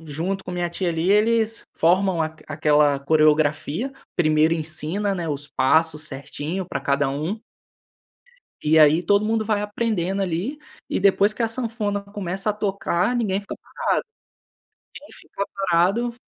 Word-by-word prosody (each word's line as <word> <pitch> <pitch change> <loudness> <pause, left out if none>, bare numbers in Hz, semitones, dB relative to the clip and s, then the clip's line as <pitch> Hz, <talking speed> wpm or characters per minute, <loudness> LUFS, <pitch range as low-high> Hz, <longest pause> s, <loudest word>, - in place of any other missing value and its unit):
junto 165 +5 -4
com - - -6
a - - -5
minha 175 -1 -1
tia, 180 +1 -2
ali, 165 +2 0
eles 225 +2 +2
formam 180 0 +2
aq 155 0 -6
aquela 150 -2 +3
coreografia. 155 - +1 0.2
Primeiro 155 0 +3
ensina, 165 +5 -2
né, 170 -3 -3
os 145 -1 -4
passos 155 +3 +2
certinho 150 +5 -5
pra - - -3
cada 140 0 +1
um 155 +10 -3 1.2
e 155 +1 +4
aí 155 +2 +6
todo 200 +4 +3
mundo 220 0 0
vai 210 -1 0
aprendendo 205 -3 -1
ali, 190 - -2 0.3
e - - 0
depois 200 +1 +3
que 225 - -4
a 230 - +1
sanfona 225 -3 -2
começa 200 0 -3
a - - 0
tocar, 200 0 -1
ninguém 205 -5 0
fica 200 - -7
parado. - - -2 0.9
Ninguém 295 - -12
fica 200 - -6
parado. 195 +6 +1
180 Hz, 150 wpm, -23 LUFS, 155-205 Hz, 1.2 s, aí